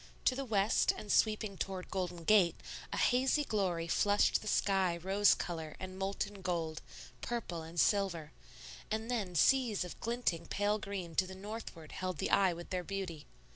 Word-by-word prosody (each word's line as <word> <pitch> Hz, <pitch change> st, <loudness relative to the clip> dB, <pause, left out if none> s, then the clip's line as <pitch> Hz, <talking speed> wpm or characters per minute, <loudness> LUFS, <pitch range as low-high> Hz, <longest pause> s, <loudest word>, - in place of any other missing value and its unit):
To 255 Hz, -, +4 dB
the 275 Hz, +1 st, -3 dB
west 210 Hz, -2 st, +3 dB
and 210 Hz, -, -5 dB
sweeping 215 Hz, -2 st, +2 dB
toward 190 Hz, -2 st, -4 dB
Golden 180 Hz, -3 st, -3 dB
Gate 190 Hz, -2 st, +5 dB, 0.4 s
a -, -, -2 dB
hazy 260 Hz, +4 st, +3 dB
glory 185 Hz, -9 st, -1 dB
flushed 205 Hz, +5 st, +3 dB
the 215 Hz, -, -8 dB
sky 190 Hz, -4 st, +2 dB
rose 195 Hz, +4 st, +4 dB
color 160 Hz, -3 st, -5 dB
and 185 Hz, 0 st, -6 dB
molten 195 Hz, +1 st, -3 dB
gold, 165 Hz, -4 st, -2 dB, 0.4 s
purple 230 Hz, -8 st, -3 dB
and 165 Hz, +2 st, -6 dB
silver; 175 Hz, -7 st, +1 dB, 0.6 s
and 220 Hz, +2 st, -2 dB
then 200 Hz, -7 st, -2 dB
seas 235 Hz, -, +3 dB
of 180 Hz, -, -9 dB
glinting 230 Hz, -8 st, -1 dB
pale 205 Hz, +1 st, 0 dB
green 190 Hz, -5 st, -5 dB
to 185 Hz, -, +3 dB
the 190 Hz, -, -8 dB
northward 195 Hz, -5 st, -8 dB
held 185 Hz, -2 st, -3 dB
the -, -, -2 dB
eye 195 Hz, -2 st, +5 dB
with 170 Hz, 0 st, -8 dB
their 180 Hz, -1 st, -1 dB
beauty. 180 Hz, -6 st, -5 dB
195 Hz, 170 wpm, -34 LUFS, 175-210 Hz, 0.6 s, Gate